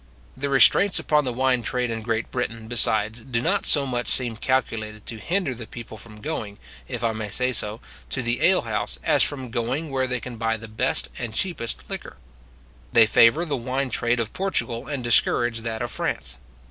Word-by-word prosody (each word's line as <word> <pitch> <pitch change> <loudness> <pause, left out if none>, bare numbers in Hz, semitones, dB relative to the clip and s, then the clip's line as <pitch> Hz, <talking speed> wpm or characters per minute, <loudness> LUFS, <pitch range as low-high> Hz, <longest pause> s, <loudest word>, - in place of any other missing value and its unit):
The 140 +1 -3
restraints 165 +8 +6
upon 150 -1 +1
the 125 - -1
wine 125 0 +1
trade 125 +1 -2
in 110 -1 -4
Great 110 0 -3
Britain, 115 -3 -4
besides, 110 -1 +1
do 120 -2 -2
not 120 - +1
so 140 -2 +5
much 125 -2 -3
seem 120 -3 +4
calculated 110 -4 -2
to 115 - -6
hinder 175 - -1
the 115 -2 -9
people 115 -2 -10
from 105 0 -13
going, 105 -9 -5 0.3
if - - -5
I 115 - +1
may 110 -1 -5
say 125 +5 +2
so, 110 -1 -1 0.3
to 130 - -2
the 120 +1 -1
alehouse, 170 - +2
as - - +2
from 130 -4 +1
going 130 +7 -3
where 130 -1 0
they 125 -1 -2
can 120 0 -8
buy 115 0 -1
the 115 +1 -10
best 110 +5 0
and 115 -3 -5
cheapest 165 -11 -2
liquor. - - -8 0.7
They 115 - +6
favour 115 +9 +4
the 150 -4 -2
wine 130 +2 -3
trade 120 +1 0
of 115 -1 -3
Portugal, 125 -10 -2
and 140 -4 -4
discourage 120 0 +3
that 115 0 -4
of 120 - -4
France. - - -3
120 Hz, 195 wpm, -23 LUFS, 115-130 Hz, 0.7 s, restraints